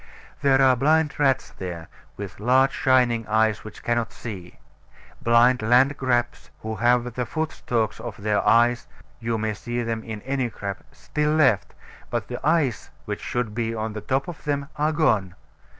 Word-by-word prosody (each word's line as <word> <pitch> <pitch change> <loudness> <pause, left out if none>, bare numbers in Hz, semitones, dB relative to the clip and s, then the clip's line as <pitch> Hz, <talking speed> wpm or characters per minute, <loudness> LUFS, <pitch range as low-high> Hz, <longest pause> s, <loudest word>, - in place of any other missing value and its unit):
There 135 -1 +4
are 130 -1 +5
blind 150 +4 +2
rats 135 -2 +2
there, 85 -4 -7 0.3
with 100 -2 -7
large 130 +4 +3
shining 125 -4 +2
eyes 110 0 +2
which 110 - -11
cannot 120 -1 0
see 95 -7 -8 0.6
blind 120 +2 +4
landcrabs, 125 +1 +2
who 110 0 -4
have 120 0 +2
the 125 -1 -3
foot 160 +4 -2
stalks 115 -3 -2
of 120 -4 -7
their 105 0 0
eyes 120 +1 +3 0.3
(you 115 -1 -1
may 110 0 -1
see 120 +5 -4
them 115 -1 -3
in 110 -2 -7
any 130 -2 -1
crab) 100 -3 -5
still 150 0 -1
left; 135 -10 +2 0.3
but - - -3
the - - -4
eyes 140 -10 +1 0.2
which - - -4
should 120 -3 -2
be 115 0 -2
on 110 0 -3
the 105 - -5
top 135 +5 -1
of 175 -3 -8
them 140 -1 -2
are 150 +1 +1
gone. 110 - +1
120 Hz, 165 wpm, -24 LUFS, 110-135 Hz, 0.6 s, are